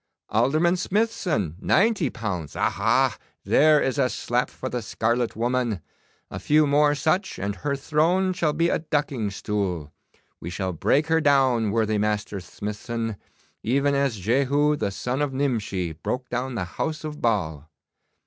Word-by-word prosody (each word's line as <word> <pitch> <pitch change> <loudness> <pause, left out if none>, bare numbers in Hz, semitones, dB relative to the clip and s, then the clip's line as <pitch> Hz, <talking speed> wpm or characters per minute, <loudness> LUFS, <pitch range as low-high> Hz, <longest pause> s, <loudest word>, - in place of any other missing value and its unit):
Alderman 155 - +2
Smithson, 180 - -1
ninety 195 - +2
pounds. 90 -11 -4
Aha! - - +2 0.3
There 155 +1 +5
is 135 +1 -1
a 130 -2 +3
slap 125 0 -1
for 130 - -6
the 125 -1 -3
scarlet 115 +3 -1
woman! 120 -2 0 0.5
A - - -5
few 155 +1 +3
more 145 +1 +3
such 180 +7 0
and 100 +1 -3
her 140 -1 -1
throne 165 +7 +1
shall 165 -5 0
be 165 +2 +2
a - - +1
ducking 145 -8 -1
stool. 95 -7 -3 0.5
We 85 - -6
shall 95 +1 -3
break 135 - +2
her 160 0 +2
down, 130 -7 +3
worthy 110 0 +1
Master 105 -1 -1
Smithson, 105 +4 -5 0.5
even 140 +5 +1
as 140 -5 +1
Jehu, 140 +8 +2
the 105 - -1
son 125 +7 -3
of 145 -2 -1
Nimshi, 110 -10 -1
broke 125 - -4
down 125 +1 -3
the 90 - -2
house 155 - -4
of 150 -1 -6
Baal. 80 -10 -1
125 Hz, 150 wpm, -24 LUFS, 105-150 Hz, 0.5 s, There